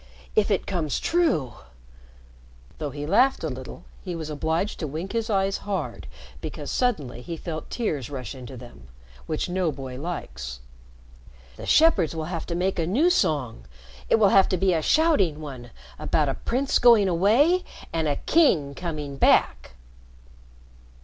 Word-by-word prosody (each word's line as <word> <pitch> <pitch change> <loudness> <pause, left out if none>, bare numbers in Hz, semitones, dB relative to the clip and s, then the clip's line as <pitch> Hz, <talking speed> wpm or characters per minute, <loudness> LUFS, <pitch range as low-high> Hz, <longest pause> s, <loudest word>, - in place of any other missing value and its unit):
If - - +3
it - - 0
comes 170 -6 -2
true 290 - +1 0.6
" - - -26
though 150 - -3
he 145 +1 -6
laughed 245 - +3
a 160 - -1
little, 130 +6 -8 0.2
he 180 -2 -4
was 160 -2 -5
obliged 160 +6 -1
to 155 - -3
wink 160 +7 -5
his 230 0 -2
eyes 195 -1 +1
hard 200 -2 -4 0.3
because - - -6
suddenly 150 - -1
he 165 +6 -6
felt 160 -1 -6
tears 155 - -2
rush 130 -6 -6
into 130 -1 -9
them, 120 - -13 0.4
which 155 - -2
no 180 -2 0
boy 130 -2 -7
likes 65 - -6 1.0
"the - - -9
shepherds 210 - +4
will 160 -1 -3
have 165 - -4
to 170 - -3
make 185 +1 0
a 160 - 0
new 290 - +3
song 135 - 0 0.4
it - - +5
will 210 -3 +4
have 190 0 +5
to 185 - +1
be 185 +1 +2
a 160 - +1
shouting 200 - +2
one 130 -6 -8 0.3
about - - +1
a - - 0
prince 265 +3 0
going 230 -5 +6
away 230 - +3 0.3
and 160 -1 0
a 145 - +1
king 160 - +2
coming 150 -3 -5
back!" 65 - +2
165 Hz, 165 wpm, -25 LUFS, 135-200 Hz, 1.0 s, going